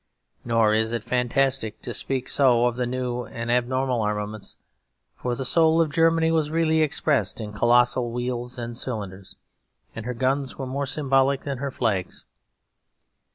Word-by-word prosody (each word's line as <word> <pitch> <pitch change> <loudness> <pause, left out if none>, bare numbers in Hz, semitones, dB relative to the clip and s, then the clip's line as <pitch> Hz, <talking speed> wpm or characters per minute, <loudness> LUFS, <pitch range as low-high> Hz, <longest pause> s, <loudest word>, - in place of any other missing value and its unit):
Nor 115 -2 +3
is 110 +1 +1
it 115 -2 -2
fantastic 125 -1 0
to - - -4
speak 130 -1 -2
so 125 -4 +3
of 120 -1 +1
the 125 0 -1
new 125 -1 -2
and 115 +1 -4
abnormal 125 0 +1
armaments; 105 0 -3 0.6
for 125 -1 -3
the 135 - -4
soul 160 +2 +4
of 160 -3 +2
Germany 165 0 +3
was 160 -2 +1
really 160 0 +2
expressed 140 -8 +1
in 105 -2 -6
colossal 120 +2 +3
wheels 125 +1 -4
and 120 -1 -5
cylinders; 100 -6 -5 0.6
and 110 +1 -6
her 125 - -3
guns 135 +2 -1
were 135 - -4
more 140 +2 -3
symbolic 135 -1 +1
than 140 -2 -4
her 140 +1 -2
flags. 105 -8 -2
125 Hz, 155 wpm, -24 LUFS, 115-135 Hz, 0.6 s, soul